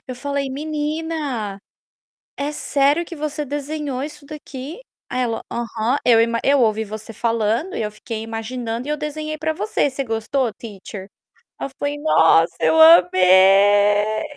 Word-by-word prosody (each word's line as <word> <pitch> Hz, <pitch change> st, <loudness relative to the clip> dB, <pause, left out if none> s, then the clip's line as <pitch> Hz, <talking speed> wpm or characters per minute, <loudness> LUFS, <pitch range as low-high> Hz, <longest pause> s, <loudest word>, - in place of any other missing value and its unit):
falei: 280 Hz, +1 st, -3 dB
"Menina, 295 Hz, -6 st, -3 dB, 0.8 s
é 285 Hz, +1 st, -2 dB
sério 290 Hz, +2 st, +1 dB
que 335 Hz, -, -9 dB
você 300 Hz, 0 st, -4 dB
desenhou 290 Hz, -1 st, -4 dB
isso 295 Hz, -1 st, -8 dB
daqui?" 295 Hz, -, -9 dB, 0.3 s
Aí 255 Hz, -, -2 dB
ela: 230 Hz, -2 st, -2 dB
"Aham. 235 Hz, +2 st, -1 dB
Eu 230 Hz, -2 st, +5 dB
ima 230 Hz, 0 st, +1 dB
eu 280 Hz, -1 st, +3 dB
ouvi 220 Hz, -1 st, +1 dB
você 215 Hz, +2 st, -8 dB
falando 230 Hz, -, -1 dB
e -, -, -2 dB
eu 210 Hz, -, -3 dB
fiquei 220 Hz, +1 st, -7 dB
imaginando 230 Hz, +2 st, -5 dB
e -, -, -2 dB
eu 300 Hz, -, 0 dB
desenhei 305 Hz, +1 st, -5 dB
para 315 Hz, +1 st, -1 dB
você. 250 Hz, +1 st, -1 dB
Você 275 Hz, +1 st, -4 dB
gostou, 225 Hz, +1 st, -2 dB
teacher?" 200 Hz, -3 st, -9 dB, 0.5 s
Ela -, -, -3 dB
foi: 285 Hz, 0 st, -2 dB
"Nossa, 165 Hz, -, +4 dB
eu 160 Hz, 0 st, +3 dB
amei!". 195 Hz, +5 st, +5 dB
245 Hz, 145 wpm, -20 LUFS, 215-290 Hz, 0.8 s, Eu